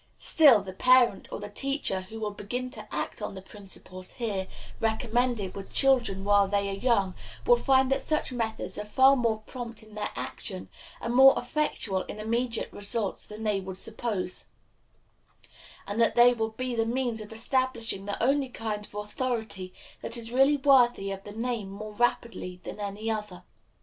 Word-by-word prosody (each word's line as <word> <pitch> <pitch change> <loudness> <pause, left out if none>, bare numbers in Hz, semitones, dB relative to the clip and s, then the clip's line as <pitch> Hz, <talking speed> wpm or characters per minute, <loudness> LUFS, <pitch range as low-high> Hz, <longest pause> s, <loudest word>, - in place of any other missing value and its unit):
Still, 270 -11 +6
the 190 -1 -7
parent 250 -1 +4
or - - -4
the 205 0 -7
teacher 270 -5 -1
who 220 +4 -9
will 210 -1 -2
begin 245 +5 -5
to - - -11
act - - -3
on - - -4
the 190 - -7
principles 190 -2 -8
here 205 -6 -2 0.3
recommended 225 -2 0
with 195 -1 -8
children 240 -8 +2
while 200 0 +4
they 200 0 0
are 195 - -5
young 200 -5 +2 0.3
will - - +7
find 265 +1 +3
that 270 - +2
such 305 -3 -1
methods 225 -4 -3
are - - -2
far 265 +6 +5
more 225 -4 0
prompt 235 -4 -7
in 215 0 -16
their 210 0 -3
action - - -5 0.3
and 235 - -3
more 270 +2 +8
effectual 245 -7 -1
in 215 - -8
immediate 230 +2 -1
results 205 0 -2
than 215 +1 -8
they 210 -2 +1
would 190 -1 -6
suppose, 215 -4 -3 1.4
and 205 +3 -1
that 230 - +3
they 240 +1 +7
will 225 -2 -1
be 250 +3 -4
the 225 -1 +1
means 240 -2 -1
of 210 - -10
establishing 230 -3 0
the 205 - -2
only 275 +1 +2
kind 215 -3 -4
of - - -18
authority 210 -3 -3 0.3
that 230 - -3
is 230 0 -4
really 270 +3 +4
worthy 245 -7 +4
of 195 0 -6
the 205 - -7
name 225 -2 -3
more 210 +2 -7
rapidly 210 -5 -1
than - - -7
any 205 +2 -3
other. 210 -4 -5
225 Hz, 175 wpm, -28 LUFS, 205-245 Hz, 1.4 s, more